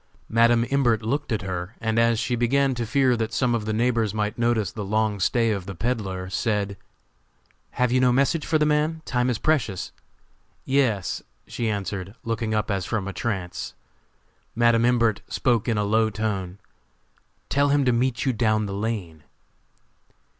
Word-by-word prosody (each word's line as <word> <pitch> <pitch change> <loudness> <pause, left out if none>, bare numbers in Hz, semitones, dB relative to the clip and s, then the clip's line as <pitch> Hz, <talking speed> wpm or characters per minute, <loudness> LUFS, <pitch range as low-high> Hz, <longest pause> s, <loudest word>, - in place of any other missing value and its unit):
Madam 115 +1 +4
Imbert 120 -6 +2
looked 130 +5 -2
at 110 -4 -1
her, 95 +2 -4
and 115 0 0
as 115 0 +3
she 110 +2 -1
began 135 +3 +2
to 120 -2 -3
fear 130 0 +3
that 110 -1 -2
some 120 +1 +1
of 115 -2 -1
the 110 - -1
neighbors 115 -1 +1
might 105 0 -1
notice 115 -4 +1
the 105 - -5
long 105 0 0
stay 115 +4 +2
of 100 -4 -3
the 100 - -6
peddler, 95 -3 -2
said: 100 0 -1 1.0
"Have 125 -1 +1
you 130 - +3
no 125 -1 +4
message 140 +5 +2
for 160 - +1
the 150 - +2
man? 155 +2 +1
Time 125 0 0
is 120 - 0
precious!" 115 - 0 0.7
"Yes," 125 -9 +1 0.2
she 115 -2 -3
answered, 100 -1 -4
looking 115 -1 -2
up 105 0 0
as 95 -2 -1
from 100 0 -2
a 100 - -4
trance. 95 -7 -4 0.8
Madam 120 0 +4
Imbert 115 -4 +2
spoke 120 -3 0
in 115 -3 +1
a 105 - +1
low 110 +2 +2
tone: 100 -4 -3 0.9
"Tell 140 +1 +2
him 140 -1 +3
to 125 - +4
meet 125 +1 0
you 130 - +2
down 110 -2 +1
the 100 - -5
lane." 100 -7 -4
115 Hz, 175 wpm, -24 LUFS, 105-125 Hz, 1.0 s, Madam